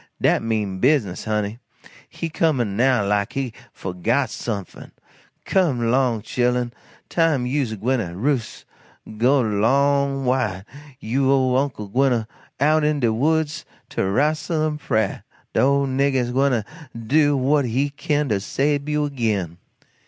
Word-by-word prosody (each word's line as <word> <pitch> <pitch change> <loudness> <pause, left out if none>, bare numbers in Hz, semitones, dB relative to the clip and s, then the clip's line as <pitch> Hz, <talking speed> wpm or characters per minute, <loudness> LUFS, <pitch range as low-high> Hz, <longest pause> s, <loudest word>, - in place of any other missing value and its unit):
Dat - - +2
mean 105 -4 -2
business, 125 -7 +1
honey. 105 +1 -2 0.5
He 165 - -5
comin' 140 -10 0
now 125 -2 +3
like 100 0 0
he 135 -4 -3 0.2
fo'got 110 +9 -1
sumfin. 100 -6 -6 0.5
Come 130 -12 +1
'long, 125 -4 +1
chil'en, 125 -1 0 0.3
time 160 -7 +1
you's 125 -3 -1
gwyne 125 +5 0
to 85 - -9
roos'. 130 +1 -2 0.5
Go 130 +4 +4
'long 135 +5 +1
wid 110 -7 0 0.3
you 135 +4 +1
ole 130 -2 +3
Uncle 130 -5 -1
Daniel 130 +7 +2
gwyne 115 -3 0 0.3
out 155 +2 +3
in 150 -1 +1
de 115 -4 +2
woods 155 +5 0 0.3
to - - -2
rastle 155 - 0
in 150 -1 -4
prah 110 -8 -1 0.3
de - - +1
ole 140 +1 +3
nigger 135 -2 +1
gwyne 130 -3 +2
to - - -28 0.3
do 145 +5 +2
what 140 +2 +2
he 135 +5 0
kin 145 0 -1
to 105 -2 +1
sabe 140 +7 -1
you 150 0 +1
agin." 105 - -2
130 Hz, 145 wpm, -22 LUFS, 110-140 Hz, 0.5 s, Go